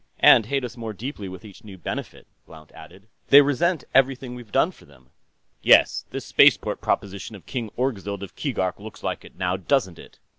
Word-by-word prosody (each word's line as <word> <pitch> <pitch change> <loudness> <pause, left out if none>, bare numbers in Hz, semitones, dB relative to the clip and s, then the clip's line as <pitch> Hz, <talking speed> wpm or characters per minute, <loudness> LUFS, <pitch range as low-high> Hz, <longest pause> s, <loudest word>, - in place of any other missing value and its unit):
"And 110 - +7
hate 135 +1 -1
us 125 - -6
more 115 -2 -6
deeply 105 -3 -7
with 95 +2 -10
each 100 -3 -14
new 100 -3 -11
benefit," 85 - -6 0.2
Blount 80 -2 -15
added. 95 +4 -15 0.2
"They 140 - +9
resent 145 +4 0
everything 130 -1 +2
we've 120 -4 -11
done - - +2
for - - -20
them." 65 -3 -22 0.5
"Yes, - - +4
this - - -6
spaceport - - +3
proposition 100 +2 -3
of 100 - -14
King 120 -5 -4
Orgzild 100 -6 -3
of 100 - -10
Keegark 95 -11 -2
looks 105 0 -11
like - - -3
it, - - -15
now 90 0 -1
doesn't 95 -3 0
it?" - - -15
105 Hz, 190 wpm, -23 LUFS, 95-130 Hz, 0.5 s, They